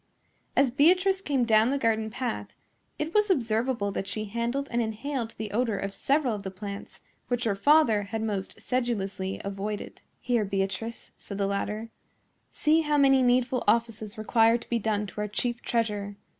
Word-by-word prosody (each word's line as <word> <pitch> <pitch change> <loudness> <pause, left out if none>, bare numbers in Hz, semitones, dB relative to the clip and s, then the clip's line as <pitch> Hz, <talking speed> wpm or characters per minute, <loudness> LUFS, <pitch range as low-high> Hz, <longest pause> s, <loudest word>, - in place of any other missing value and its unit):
As 275 -3 +4
Beatrice 370 +8 +4
came 275 -8 +1
down 220 0 +4
the 280 - +1
garden 220 -3 +1
path, 245 +1 -4 0.4
it 305 +2 -3
was 425 -1 +3
observable 230 - +1
that 195 - -4
she 215 +2 -3
handled 235 +6 -2
and 240 0 +1
inhaled 230 +2 -3
the 215 -2 -5
odor 225 -1 0
of 195 0 -4
several 275 -1 +1
of 205 - -4
the 195 - -5
plants 200 +1 -8 0.3
which 245 -1 -1
her 220 - +1
father 235 0 +4
had 220 +2 -3
most 200 -3 -3
sedulously 200 -6 -2
avoided. 200 +1 -5 0.2
"Here, 240 -3 +1
Beatrice," 195 +3 -3
said 200 - -7
the 200 - +1
latter, 210 +3 -3 0.6
"see 310 +2 +2
how 300 -1 +1
many 270 -2 +5
needful 250 0 +2
offices 225 -3 0
require 225 +1 +4
to 235 - -14
be 235 - +1
done 210 -1 0
to 205 +2 -6
our 210 - -1
chief 240 +3 -2
treasure. 210 -3 -1
225 Hz, 170 wpm, -27 LUFS, 205-255 Hz, 0.6 s, many